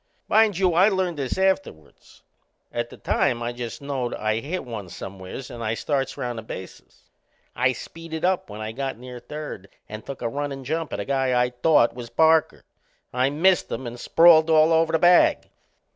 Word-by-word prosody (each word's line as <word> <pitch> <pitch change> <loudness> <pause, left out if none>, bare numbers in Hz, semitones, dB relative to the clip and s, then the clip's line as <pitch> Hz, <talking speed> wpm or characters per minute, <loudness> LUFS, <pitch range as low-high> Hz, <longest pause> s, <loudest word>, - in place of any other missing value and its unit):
Mind 215 -4 +3
you, 185 -2 +2
I 185 +5 +5
learned 185 -4 -1
this 135 +3 -3
afterward. 190 - -1 0.8
At 120 0 -2
the - - -13
time 120 -4 0
I 120 +1 -3
just 120 +4 -7
knowed 135 -4 -3
I'd 110 +1 -1
hit 165 +2 -4
one 110 -6 -7
somewheres 95 +8 -8
and 120 -1 -7
I 110 0 -1
starts 135 0 -2
round 120 -4 -4
the - - -6
bases. 95 -4 -11 0.5
I 125 0 +2
speeded 165 +4 -6
up 185 -7 0
when 105 +1 -8
I 110 0 -4
got 135 +2 -4
near 125 0 -9
third 150 -10 -8 0.2
and 110 +1 -8
took 135 -2 -8
a - - 0
runnin' 140 +2 -4
jump 160 +4 -3
at - - -4
a - - -3
guy 135 -2 +1
I 125 0 +1
thought 125 0 +3
was 120 -1 -8
Parker. 160 +2 +3 0.5
I 125 +2 +2
missed 170 +4 +2
him 130 +3 -4
and 120 0 -7
sprawled 165 +1 +5
all 160 0 +5
over 160 0 +3
the 160 - +3
bag. 180 - +4
135 Hz, 190 wpm, -24 LUFS, 120-160 Hz, 0.8 s, I